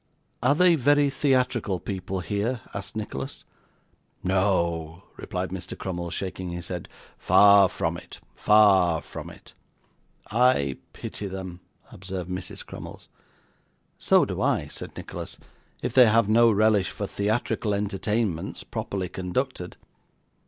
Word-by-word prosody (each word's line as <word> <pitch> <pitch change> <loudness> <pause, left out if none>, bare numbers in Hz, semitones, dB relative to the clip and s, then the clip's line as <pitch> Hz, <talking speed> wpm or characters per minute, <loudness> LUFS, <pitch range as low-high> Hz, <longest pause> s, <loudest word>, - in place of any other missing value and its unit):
'Are 130 +4 +3
they 180 +1 +5
very 145 -1 +3
theatrical 125 -8 +1
people 95 -1 -4
here?' 105 +7 -2
asked 100 0 -6
Nicholas. 70 -11 -5 0.8
'No,' 85 -3 0
replied 90 +1 -4
Mr. 95 -1 -6
Crummles, 85 -2 -4
shaking 95 -1 -4
his 85 0 -6
head, 90 -2 -5 0.3
'far 100 -2 +6
from 85 -3 -2
it - - -12
far 95 -6 +4
from - - -8
it.' - - -15 0.8
'I 110 - +3 0.2
pity 105 - -5
them,' 95 -2 -7 0.3
observed 95 -1 -6
Mrs. 90 0 -5
Crummles. - - -10 0.9
'So - - +4
do - - -4
I,' - - +1
said - - -9
Nicholas; - - -7 0.5
'if - - -2
they 125 -2 +8
have 115 -1 +4
no 115 +2 +5
relish 105 -2 +3
for 100 - -5
theatrical 105 +1 -1
entertainments, 100 -2 -2
properly 95 -2 -4
conducted. 95 +2 -3
100 Hz, 125 wpm, -26 LUFS, 90-110 Hz, 0.9 s, they